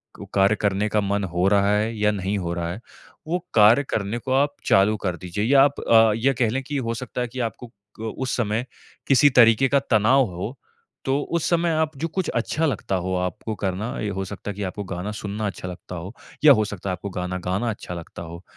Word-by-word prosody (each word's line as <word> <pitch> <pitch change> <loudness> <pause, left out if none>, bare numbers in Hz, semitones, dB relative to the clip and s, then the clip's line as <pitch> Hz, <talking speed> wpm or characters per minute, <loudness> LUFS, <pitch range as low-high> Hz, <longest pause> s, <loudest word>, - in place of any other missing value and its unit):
को - - -9
कार्य 100 +2 +4
करने 100 0 0
का 105 0 +1
मन 100 0 -1
हो 90 +2 +3
रहा 100 0 +3
है 110 +2 -1
या 105 0 +2
नहीं 100 0 -2
हो 85 -2 -3
रहा 85 -1 -3
है, 95 - -6 0.5
वो 175 +3 0
कार्य 110 +5 +6
करने 105 +2 -1
को 130 +2 -5
आप 145 +2 +2
चालू 100 +2 +4
कर 90 -4 -2
दीजिए 90 +3 -4
या 135 +3 +6
आप 140 0 +1
अ, 115 -1 +5
ये 130 +5 +2
कह 120 -3 +1
लें 130 +4 -1
कि 145 +2 -4
हो - - 0
सकता 125 +1 -5
है 125 - -1
कि 125 +2 -8
आपको 125 - -12
क - - -24 0.5
उस 130 -1 -2
समय 115 +1 -1 0.4
किसी 140 +1 +6
तरीक़े 120 0 +5
का 140 +1 +4
तनाव 130 +1 +3
हो, 95 +9 -6 0.5
तो 135 +1 +1
उस 170 +1 -1
समय 170 0 +2
आप 155 -1 0
जो 165 - -2
कुछ 185 +2 -2
अच्छा 150 +7 -1
लगता 110 -8 -1
हो 95 0 -2
आपको 90 +4 -3
करना, 100 +4 -3
ये 105 - -2
हो 95 -1 -3
सकता 100 +1 -6
है - - -9
कि 105 - -4
आपको 100 +2 -4
गाना 95 +2 -5
सुनना 105 0 -4
अच्छा 95 -2 -6
लगता 90 0 -8
हो 90 +5 -7 0.3
या 145 - +10
हो 110 -2 +2
सकता 100 -2 -6
है - - 0
आपको 90 +3 -6
गाना 90 0 -3
गाना 95 +6 0
अच्छा 100 -4 -6
लगता 85 -1 -8
हो। 85 +2 -9
105 Hz, 235 wpm, -23 LUFS, 95-125 Hz, 0.5 s, या